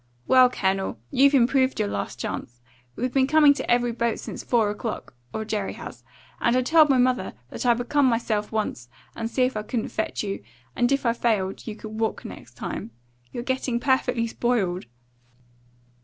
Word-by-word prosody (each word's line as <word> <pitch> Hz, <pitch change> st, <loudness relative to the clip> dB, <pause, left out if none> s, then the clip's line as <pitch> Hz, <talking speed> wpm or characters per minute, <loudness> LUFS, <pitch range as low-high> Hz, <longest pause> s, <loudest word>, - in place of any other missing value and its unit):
"Well, 255 Hz, -1 st, +6 dB
Colonel, 190 Hz, -, -1 dB
you've 280 Hz, +2 st, +5 dB
improved 260 Hz, +1 st, +3 dB
your -, -, +1 dB
last 100 Hz, 0 st, -4 dB
chance. 120 Hz, +1 st, -5 dB, 0.4 s
We've 250 Hz, +1 st, -2 dB
been 265 Hz, -1 st, +3 dB
coming 300 Hz, -1 st, +6 dB
to 285 Hz, -, -5 dB
every 240 Hz, 0 st, +3 dB
boat 235 Hz, -1 st, -1 dB
since -, -, -7 dB
four 225 Hz, -4 st, +2 dB
o'clock, 215 Hz, -, -5 dB, 0.2 s
or 220 Hz, -, -4 dB
Jerry 210 Hz, -2 st, -2 dB
has, -, -, -9 dB, 0.4 s
and 235 Hz, -, +2 dB
I 255 Hz, -, +3 dB
told 310 Hz, +2 st, +5 dB
mother 250 Hz, -6 st, +2 dB, 0.2 s
that -, -, -3 dB
I 240 Hz, -, +6 dB
would 245 Hz, +1 st, -4 dB
come 290 Hz, -2 st, +3 dB
myself 225 Hz, -3 st, 0 dB
once, 210 Hz, -, -3 dB, 0.3 s
and 225 Hz, 0 st, -3 dB
see 255 Hz, +2 st, +1 dB
if 255 Hz, -1 st, 0 dB
I 215 Hz, -, -1 dB
couldn't 220 Hz, +1 st, -3 dB
fetch 220 Hz, -, -2 dB
you; 200 Hz, -1 st, -4 dB, 0.3 s
and 245 Hz, +2 st, +2 dB
if 275 Hz, -1 st, +1 dB
I 235 Hz, -, +3 dB
failed, 215 Hz, -5 st, -1 dB
you 215 Hz, -, -4 dB
could 215 Hz, 0 st, -8 dB
walk 220 Hz, -1 st, -1 dB
next -, -, -10 dB
time. -, -, -5 dB, 0.4 s
You're 240 Hz, -, -5 dB
getting 260 Hz, -2 st, -1 dB
perfectly 250 Hz, -2 st, +1 dB
spoiled." 220 Hz, -, -1 dB
235 Hz, 185 wpm, -25 LUFS, 215-255 Hz, 0.4 s, Well